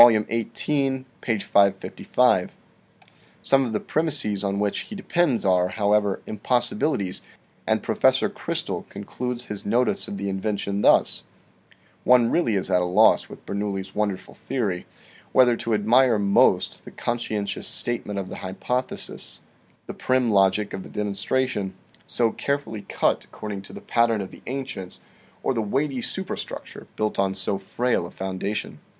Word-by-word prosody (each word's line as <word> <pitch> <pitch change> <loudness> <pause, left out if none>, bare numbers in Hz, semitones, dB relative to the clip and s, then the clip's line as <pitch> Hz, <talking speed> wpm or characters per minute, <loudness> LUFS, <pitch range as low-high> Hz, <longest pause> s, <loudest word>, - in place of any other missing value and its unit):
XVIII, 130 +4 +2 0.2
page 110 -4 -1
555. 100 -1 +2 0.9
Some 135 -1 +4
of - - -4
the 105 - 0
premises 140 -11 0
on 100 0 0
which 105 -1 0
he 215 - -7
depends 175 - +1
are, 90 -1 +4
however, 105 0 +1
impossibilities, 110 -2 0 0.5
and - - +1
Professor - - +3
Chrystal - - -4
concludes 120 +5 -5
his 105 -1 -6
notice 120 +5 +1
of 100 - -5
the 100 +1 -3
invention 100 +1 -2
thus: - - +4 0.4
" - - -31
One 120 -2 +5
really 140 -11 +2
is 95 0 -1
at 90 -1 +4
a - - +1
loss 100 +5 +4
with - - -12
Bernoulli's 100 -1 -3
wonderful 105 -3 -2
theory, 105 -9 -3 0.5
whether 125 -2 +6
to 115 -1 0
admire 120 +3 +4
most 100 -1 +3
the - - -10
conscientious 105 -4 -3
state 120 0 -1
ment 105 -1 -4
of 95 -1 -3
the - - -6
hypothesis, 110 +8 -3 0.4
the - - -6
prim 130 -2 +1
logic 100 +1 +3
of 95 - -4
the - - -10
demonstra 105 +6 0
tion 95 -6 -4 0.3
so 115 -2 +1
carefully 140 -7 -2
cut 100 - 0
according 105 -2 -6
to 95 - -13
the - - -8
pattern 115 -2 +2
of 95 - -6
the - - -13
ancients 125 -8 -5 0.4
or - - +1
the 115 - 0
weighty 135 +5 -1
superstructure 190 +9 -4
built 110 -2 -1
on 95 0 +1
so 95 +1 0
frail 120 +5 0
a - - -13
foundation. 95 +2 -4
105 Hz, 150 wpm, -24 LUFS, 100-125 Hz, 0.9 s, whether